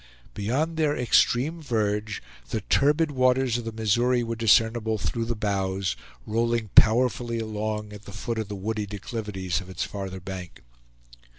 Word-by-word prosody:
Beyond 140 +11 -1
their 150 -2 +2
extreme 130 +6 +2
verge, 105 -5 -1 0.3
the 110 - -2
turbid 150 - +2
waters 130 -2 +2
of 120 - -7
the 115 - -3
Missouri 120 +3 +2
were 115 0 -3
discernible 115 0 +3
through 115 +2 -2
the 120 0 -2
boughs, 95 -2 -1 0.3
rolling 115 0 0
powerfully 120 +1 +4
along 105 -1 -3
at 105 +1 -11
the - - -9
foot 110 +3 -3
of 110 - -3
the 105 - -5
woody 105 +2 -3
declivities 100 -3 -3
of 95 - -12
its 95 - -3
farther 95 -2 -5
bank. 90 -4 -8
110 Hz, 155 wpm, -26 LUFS, 105-120 Hz, 0.3 s, powerfully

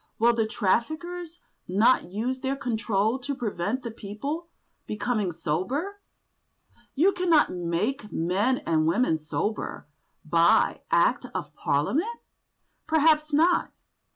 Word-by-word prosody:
Will 235 +2 +4
the 225 -2 0
traffickers 315 - -2 0.3
not 210 +7 +3
use 225 +8 -3
their 270 +1 -1
control 225 -3 0
to 280 +2 -4
prevent 240 0 -2
the 235 - -5
people 235 +11 -5 0.4
becoming 210 -3 -1
sober? 245 - -3 0.9
"You 345 +8 +4
cannot 345 -5 +3
make 180 +7 -2
men 200 +10 0
and 155 -1 +2
women 165 -2 +2
sober 190 +7 -3 0.4
by 165 +1 +3
Act - - +2
of - - -4
Parliament?" 305 - 0 0.7
Perhaps 310 -1 +3
not. 330 +4 +3
235 Hz, 110 wpm, -26 LUFS, 190-300 Hz, 0.9 s, Will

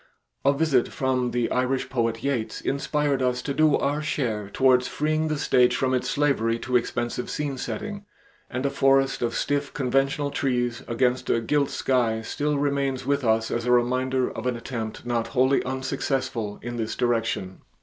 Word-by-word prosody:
A 140 - +5
visit 140 -3 +2
from 130 -2 0
the 120 -1 -1
Irish 130 +1 0
poet 115 -3 -1
Yeats 130 -6 -1
inspired 140 0 0
us 125 -1 +1
to 140 - -2
do 155 0 +4
our 145 +2 0
share 115 -9 -2
towards 125 +1 +3
freeing 155 +1 0
the 155 -1 -1
stage 125 -4 +3
from 130 -1 0
its 125 - 0
slavery 135 -6 +1
to 125 +1 -3
expensive 120 0 -1
scene 145 -2 -2
setting, 205 +9 -5 0.4
and 130 +2 -3
a 140 - +1
forest 135 0 +3
of 115 -1 -1
stiff 145 0 -1
conventional 135 +2 +1
trees 120 -4 -1
against 125 +1 0
a 115 - +3
gilt 140 +5 +1
sky 115 -4 0
still 145 +5 -1
remains 140 -2 0
with 140 0 +1
us 110 -1 +1
as 120 +1 -2
a - - +3
reminder 125 +1 +2
of 110 +3 -5
an 125 - 0
attempt 115 -2 -5
not 120 -1 -1
wholly 130 +1 +2
unsuccessful, 130 -4 -2
in 120 0 -5
this 110 -1 -2
direction. 115 -6 -1
130 Hz, 170 wpm, -25 LUFS, 120-140 Hz, 0.4 s, A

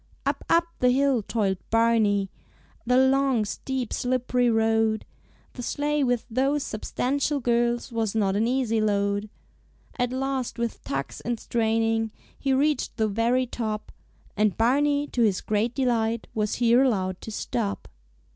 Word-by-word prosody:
Up, - - -1
up 335 0 +4
the 250 - +4
hill 265 -1 +2
toiled 195 -3 -1
Barney, 220 -4 +2 0.6
The 250 0 +4
long, 265 -3 +3
steep, 255 +2 -4
slipp'ry 250 -1 +1
road; 225 -1 +2 0.5
The 250 - -7
sleigh 295 +3 0
with 245 -3 0
those 270 +4 0
substantial 280 +6 -1
girls 240 0 0
Was 225 -2 -1
not 200 -3 +1
an 220 +3 +2
easy 240 -3 +1
load. 205 0 0 0.7
At 245 0 +1
last 265 -1 -2
with 235 -1 -3
tugs 135 0 -4
and 235 -1 -3
straining 225 -1 0 0.3
He 275 - 0
reached 290 +3 +1
the 220 -2 +2
very 230 +5 +1
top, 215 -3 -4 0.4
And 210 -2 +1
Barney 285 +5 +2
to 245 - -1
his 205 -5 +3
great 215 +3 -1
delight 230 -4 0
Was 210 -1 -1
here 240 +1 +4
allowed 190 -8 0
to - - -8
stop. 215 -1 -3
235 Hz, 145 wpm, -25 LUFS, 220-255 Hz, 0.7 s, up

